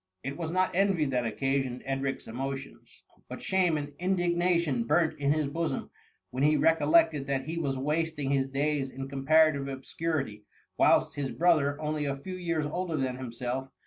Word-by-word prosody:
It 140 +1 -4
was 165 -1 -4
not 185 +2 +1
envy 190 -4 +2
that 125 -3 0
occasioned 135 0 -1
Edric'^s 135 0 -2
emo 135 +4 -3
tions; 135 0 -13 0.3
but - - -6
shame 180 -4 +1
and 145 0 -5
indignation 175 -7 +1
burnt 160 +6 +2
in 140 0 +2
his 155 0 +1
bosom 160 -1 -3 0.4
when 130 - -3
he 150 +2 +4
recollected 160 -2 +3
that 135 -1 -1
he 165 +3 -3
was 135 -4 -1
wasting 150 0 -1
his 135 -1 +2
days 140 0 -1
in 135 +1 -6
comparative 140 +1 +3
obscurity, 135 -4 -3 0.3
whilst - - +3
nis 140 -2 -2
brother, 155 -4 +2
only 150 -1 -2
a 140 -1 -2
few 185 +7 -7
years 165 -4 -1
older 170 +1 -2
than 130 -2 -1
himself? 125 +1 -4
145 Hz, 170 wpm, -29 LUFS, 135-165 Hz, 0.4 s, he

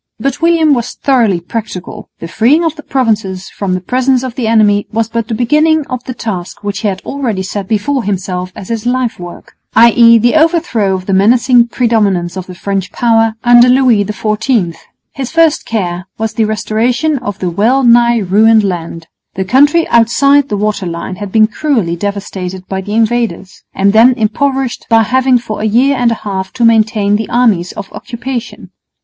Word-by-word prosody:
But 275 +5 -3
William 330 -3 +3
was 240 -2 -2
thoroughly 235 -10 +1
practical. 190 0 -7
The 165 - -8
freeing 245 - +2
of 325 -2 -1
the 300 - -10
Provinces 215 -9 -2
from 190 -2 -3
the - - -2
presence 255 +5 0
of 255 -2 -5
the 240 -2 -3
enemy 210 -2 +2
was 225 0 -1
but 230 -1 -3
the 225 - -3
beginning 300 +6 +2
of 255 -1 -4
the 255 - -6
task 200 -5 -6
which 200 -1 -3
he 215 - -2
had 195 -2 -3
already 235 -9 -3
set 195 0 -5
before 235 +6 -1
himself 185 -2 -3
as 190 - -10
his 230 0 -3
life 250 -3 -1
work, 175 -1 -11 0.2
i.e. 230 0 +6
the 240 +2 +2
overthrow 315 - +1
of 185 -1 -6
the 195 - -2
menacing 235 +4 +3
predominance 205 -8 0
of 185 -1 -6
the 180 - -10
French 195 0 -3
power 225 -2 +1
under 240 0 +6
Louis 250 -5 +3
XIV. 210 -2 -1 0.4
His 270 -4 -5
first 330 -2 +2
care 185 -4 -3
was 220 -1 -3
the 220 0 0
restoration 240 +7 -1
of 205 -5 -5
the 180 -3 -3
well 235 +9 +1
nigh 235 0 +4
ruined 215 +2 +3
land. 170 -3 -4 0.3
The 190 - -3
country 290 - +3
outside 275 +5 +3
the 205 - -2
water 210 -2 -2
line 170 +2 -6
had 205 -2 -7
been 220 +1 +4
cruelly 225 - -1
devastated 190 -1 -5
by 190 0 -4
the 205 +2 -5
invaders, 225 -5 -1
and 200 +1 +2
then 235 +4 +6
impoverished 260 +3 -2
by 225 -1 +4
having 260 +3 +2
for 230 -3 -6
a - - -1
year 250 +6 +2
and 245 -2 +1
a 230 - -1
half 190 -2 -4
to 245 -2 0
maintain 215 -2 +2
the 220 - -5
armies 220 -8 +1
of 195 - -9
occupation. 245 0 -7
225 Hz, 185 wpm, -12 LUFS, 200-250 Hz, 0.4 s, i.e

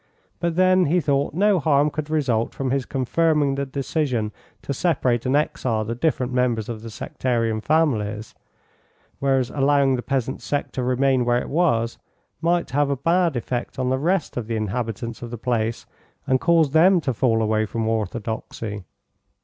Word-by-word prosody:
But 170 -1 -1
then 185 0 +4
he 175 +5 +3
thought 140 -1 0
no 200 0 +3
harm 145 -1 +2
could 155 0 -4
result 130 -8 0
from 135 -2 -2
his 135 -2 -1
confirming 145 +2 +1
the 140 0 -2
decision 135 -5 -1 0.3
to 140 - -3
separate 130 -6 0
and 130 - +2
exile 120 -7 0
the 115 - -3
different 125 -1 -1
members 120 -4 +1
of 110 -2 -5
the 115 - -8
sectarian 115 -1 -2
families, 110 -9 0 0.9
whereas 135 -2 +1
allowing 140 -1 +3
the - - -3
peasant 130 -1 -2
sect 145 -1 -3
to 130 - -2
remain 130 +1 +2
where 120 0 +2
it - - -6
was 135 -8 +1 0.4
might 170 -1 +1
have 145 +1 +1
a 140 - +1
bad 170 +2 +2
effect 120 +1 -3
on 130 -1 0
the 130 - +1
rest 175 +1 0
of 115 -3 -3
the 115 - -2
inhabitants 115 +1 -3
of 120 - -6
the 120 - -6
place 115 -1 -1 0.4
and 130 -1 +1
cause 165 -4 +3
them 175 +4 +5
to 135 -4 -1
fall 115 -1 +2
away 110 0 +1
from 115 0 -2
Orthodoxy. 110 -2 -3
130 Hz, 175 wpm, -23 LUFS, 115-150 Hz, 0.9 s, them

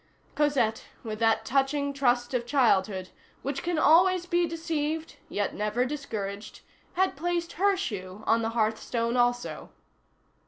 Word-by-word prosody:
Cosette, 275 -7 +1 0.2
with 215 -1 -5
that 225 -1 +2
touching 280 +2 +1
trust 245 -2 +1
of 240 -1 -1
childhood, 195 -8 +2 0.3
which 275 0 -3
can 345 -1 -1
always 355 +3 +5
be 345 0 +1
deceived 320 -1 -3
yet 205 0 -1
never 210 +4 0
discouraged, 215 -8 -5 0.3
had 375 +1 +1
placed 340 +2 -2
her 395 +2 +2
shoe 200 - -5
on 230 +1 +3
the 225 - -1
hearth 220 0 +1
stone 235 0 -1
also. 245 0 0
260 Hz, 140 wpm, -28 LUFS, 225-320 Hz, 0.3 s, always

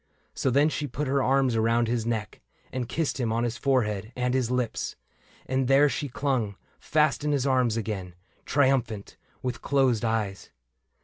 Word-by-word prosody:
So 135 - 0
then 140 +4 +4
she 150 -1 -3
put 140 +3 -3
her 135 +1 +2
arms 135 -2 +2
around 115 +1 +2
his 115 -1 -1
neck. 110 -3 -3 0.3
And 125 -1 -3
kissed 155 +1 -1
him 115 -3 0
on 115 +1 0
his 120 -1 -1
forehead 110 -6 0
and 125 0 0
his 130 -3 +1
lips; 125 -2 -2 0.5
And 130 0 0
there 140 +2 +5
she 145 0 -3
clung, 125 -6 -1 0.2
fast 150 -2 +1
in 150 - +1
his 140 -2 +1
arms 125 -4 +2
again, 95 -5 -4 0.3
Triumphant, 130 -7 +1 0.3
with 125 -2 -3
closed 130 -5 +2
eyes. 110 -4 -2
125 Hz, 170 wpm, -27 LUFS, 115-135 Hz, 0.5 s, there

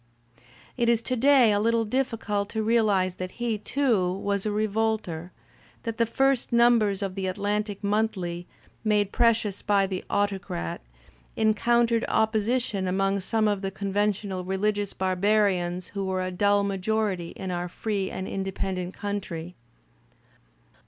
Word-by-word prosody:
It 235 -1 +2
is 230 -1 +2
to 255 - -1
day 255 -3 +5
a 205 - +2
Kttle 225 +1 +1
dif 265 +4 +1
ficult 210 -3 -2
to 220 -1 -2
realize 210 -5 +2
that 185 0 -5
he, 235 -3 -2
too, 220 -7 +1
was 200 +1 -2
a - - 0
revolter, 210 -5 -1 0.5
that 230 0 -4
the 230 - +3
first 270 +2 +1
numbers 230 -4 +4
of 195 -2 -3
the 190 0 -3
Atlantic 205 +2 -2
Monthly, 195 -5 -1 0.4
made 210 -2 +2
precious 230 -4 +2
by 200 -2 +2
The 190 -1 -4
Autocrat," 195 - -2 0.5
encountered 230 +2 +2
opposition 220 -2 +1
among 195 +2 +1
some 215 +3 +1
of 205 -2 0
the 195 - -2
con 195 0 -5
ventional 205 -2 0
religious 205 +2 -1
barbarians 185 -2 +1
who 200 -1 -4
were 190 -1 -1
a 185 - -3
dull 200 +2 +2
majority 195 -2 -1
in 190 -1 -5
our 175 0 -2
free 195 +1 -2
and 190 - -5
independent 190 -1 -3
country. 185 -4 -4
205 Hz, 145 wpm, -26 LUFS, 190-220 Hz, 0.5 s, day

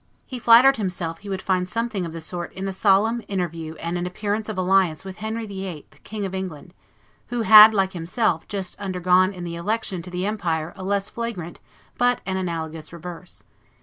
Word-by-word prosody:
He 255 -3 -6
flattered 240 +3 +7
himself 180 -5 -3
he 205 - -10
would 190 -1 -3
find 185 -1 0
something 225 -4 -2
of - - -7
the 165 0 -6
sort 175 +2 -5
in 190 +1 -4
a 195 - -3
solemn 210 +4 +3
interview 165 -4 -3
and 170 +2 -3
an 175 - -2
appearance 210 +4 -3
of 215 - -4
alliance 185 -3 +2
with 190 -1 -8
Henry 220 +1 -4
VIII., 190 -6 -6 0.2
King 210 -2 -5
of 190 - -5
England, 180 -3 -6 0.5
who 240 -2 -2
had, 215 0 +10
like 195 -3 +1
himself, 175 +1 -1
just 195 -3 -4
undergone 185 -1 +2
in 180 -3 -8
the 170 -1 -5
election 195 0 -2
to 180 - -9
the 180 +1 -3
empire 175 -6 -2
a 190 - -8
less 200 +1 -1
flagrant 220 -8 -5 0.4
but 245 0 +3
an 190 - -2
analogous 165 -4 -4
reverse. 175 +1 -10
190 Hz, 190 wpm, -23 LUFS, 175-210 Hz, 0.5 s, had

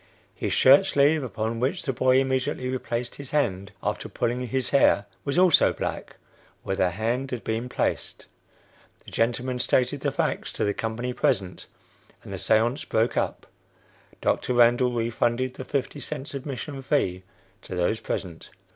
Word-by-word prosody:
His - - -3
shirt 140 +9 +6
sleeve, 145 0 +3
upon 115 -2 -3
which 130 +3 -1
the 135 - -1
boy 130 +1 +3
immediately 130 0 -1
replaced 120 -2 -3
his 140 -2 -9
hand 100 -10 0
after - - -2
pulling 125 +2 -2
his 130 +2 -2
hair, 135 -7 +4 0.2
was 140 - -2
also 180 -3 +5
black - - -5 0.5
where 95 - -2
the 90 - +2
hand 115 +8 -2
had 125 -3 -5
been 115 +3 -2
placed. - - -2 0.8
The - - -11
gentleman 125 +2 0
stated 130 +3 +1
the - - 0
facts - - -1
to - - -2
the 100 - +1
company 120 +2 -3
present, 95 -6 -1 0.6
and - - -8
the - - -4
seance 120 +6 +2
broke 115 -3 0
up. - - -1 0.8
Dr. 125 - 0
Randall 120 +1 +5
refunded 120 +2 0
the 130 - -8
fifty 140 +1 -2
cents 145 +1 -6
admission 135 0 -5
fee 95 -10 0 0.4
to 95 - -7
those 90 +5 0
present." 85 -4 -5
125 Hz, 155 wpm, -25 LUFS, 115-135 Hz, 0.8 s, shirt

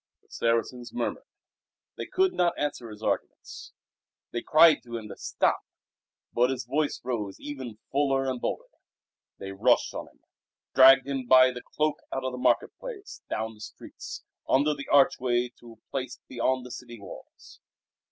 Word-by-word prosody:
The - - -32
Saracens 115 +1 -1
murmured. 245 - -3 0.7
They - - -6
could 375 0 +2
not 175 -1 +1
answer 145 -5 -3
his 105 0 -11
arguments. - - -4 0.6
They 120 - -2
cried 155 0 +6
to 120 -1 -6
him 110 -2 -8
to 100 - -8
stop, - - 0 0.7
but 125 +1 +3
his 130 -1 -3
voice 150 +1 -1
rose 110 -6 -3
ever 135 -4 -6 0.2
fuller 135 -1 +2
and 130 -2 -2
bolder. - - -2 0.7
They 95 - -7
rushed 95 - +2
on - - -6
him, - - -24 0.5
dragged 135 0 +8
him 135 -2 -3
by 130 0 +7
the 125 0 -8
cloak 150 +2 -1
out 135 - -3
of 130 - -2
the 125 - -6
market - - +2
place, 420 -5 -8
down 110 +1 -3
the 105 - -17
streets, - - -9 0.3
under 145 +3 +3
the 140 - -8
archway 125 -3 +3
to 120 -1 -13
a 110 - -28
place 130 -2 -4
beyond 130 +1 -1
the 125 - -9
city 120 -2 -9
walls. 100 - -13
130 Hz, 165 wpm, -27 LUFS, 120-140 Hz, 0.7 s, dragged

